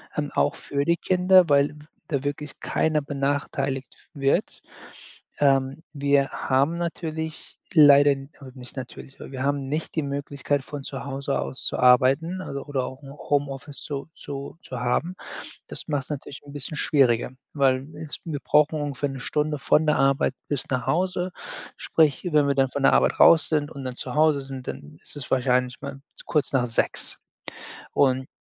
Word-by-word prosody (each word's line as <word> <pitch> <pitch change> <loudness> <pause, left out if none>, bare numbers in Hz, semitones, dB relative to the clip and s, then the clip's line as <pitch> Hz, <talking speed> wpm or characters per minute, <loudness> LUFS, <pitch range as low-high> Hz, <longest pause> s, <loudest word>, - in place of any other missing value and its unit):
Ähm, 150 -1 -1
auch - - +2
für 140 0 -2
die 170 0 +3
Kinder, 185 0 +4
weil 140 0 +4
w 150 0 -14 0.2
da 140 -3 -1
wirklich 145 0 -4
keiner 155 -1 +1
benachteiligt 140 -2 -3
wird. 135 -2 0 0.8
Ähm, 135 +1 +2
wir 140 -1 +2
haben 140 +7 +1
natürlich 160 -2 -5 0.2
leider 145 -2 +8 0.3
oder 130 -1 -10
nicht 125 -1 -11
natürlich, 135 +1 -9
weil - - -9
wir 130 0 -4
haben 140 -1 0
nicht 155 +3 -3
die 160 - +1
Möglichkeit, 140 0 -2
von 145 -1 -7
zu 135 0 -6
Hause 140 0 -2
aus 130 - -4
zu - - -1
arbeiten, 135 +9 +4
also 140 -5 -6
oder 135 -3 -1
auch 130 +2 -7
'n 135 - -11
Homeoffice 140 -1 -3
zu 140 +1 -5
zu 140 +2 -7
zu 125 -2 -7
haben. 165 +9 0 0.5
Das - - -8
macht's 145 -3 -1
natürlich 140 -1 -6
'n 145 - -12
bisschen 145 +1 -4
schwieriger, 125 -4 +3 0.2
weil 135 -1 +2
jetzt 155 -2 -5
wir 155 -4 -3
brauchen 150 +1 +3
ungefähr 145 -1 -2
'ne 135 - -6
Stunde 150 +2 -1
von 155 +3 +3
der 150 - +3
Arbeit 135 -1 +2
bis 145 -3 -2
nach 125 -2 -1
Hause. 180 +4 0 0.4
Sprich, 155 0 +2
wenn 150 -1 +4
wir 140 - +2
dann 135 -1 +2
von 140 -1 -3
der - - +6
Arbeit - - +3
raus 160 -1 +7
sind 150 -1 0
und 140 - -8
dann 125 -1 -3
zu 125 - -5
Hause 155 -2 +4
sind, 135 -1 -8
dann 150 0 -7
ist - - -4
es 135 - -6
wahrscheinlich 125 -1 +1
mal 140 -1 -7 0.2
kurz 150 -4 0
nach 125 -2 +2
18:00. 115 - -2 0.8
Und 130 -1 +2
140 Hz, 175 wpm, -25 LUFS, 135-150 Hz, 0.8 s, leider